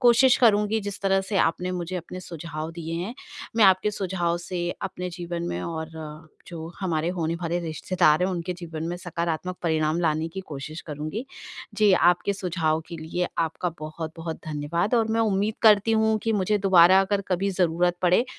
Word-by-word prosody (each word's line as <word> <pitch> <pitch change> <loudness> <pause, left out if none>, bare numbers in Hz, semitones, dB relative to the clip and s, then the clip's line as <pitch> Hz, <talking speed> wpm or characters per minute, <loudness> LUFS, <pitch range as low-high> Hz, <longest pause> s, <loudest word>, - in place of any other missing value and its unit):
कोशिश 245 +1 +6
करूँगी 210 -2 +4
जिस 205 -1 -6
तरह 195 -1 +2
से 195 +1 -3
आपने 180 +3 +1
मुझे 180 0 -4
अपने 180 +1 -7
सुझाव 165 -2 -6
दिए 165 -1 -5
हैं। 185 +8 -4 0.4
मैं 220 - +6
आपके 190 +2 +5
सुझाव 180 -4 -1
से 175 0 -3
अपने 180 -1 -4
जीवन 175 0 -5
में 85 - -3
और 160 -1 -4 0.6
जो 165 -2 -7
हमारे 165 -3 0
होने 165 -1 -1
वाले 170 0 -2
रिश्तेदार 165 0 +2
हैं 185 - +2
उनके 180 0 -3
जीवन 160 -2 -6
में 175 - -3
सकारात्मक 175 +1 -3
परिणाम 160 0 +1
लाने 160 -1 +1
की 190 +4 -6
कोशिश 155 -2 -7
करूँगी। 155 - -4 0.5
जी, 210 -1 +4
आपके 180 +2 +3
सुझाव 170 -5 -1
के 170 - -6
लिए 165 +3 -3
आपका 165 +2 0
बहुत-बहुत 160 +1 -5
धन्यवाद 155 +8 -1
और 225 -1 +2
मैं 225 - +2
उम्मीद 210 0 +1
करती 215 0 +6
हूँ 220 0 +3
कि 225 - +1
मुझे 205 +1 +1
दोबारा 190 -1 +6
अगर 195 +1 +1
कभी 190 +2 0
ज़रूरत 175 -1 +1
पड़े 180 +7 +4
175 Hz, 175 wpm, -25 LUFS, 165-195 Hz, 0.6 s, कोशिश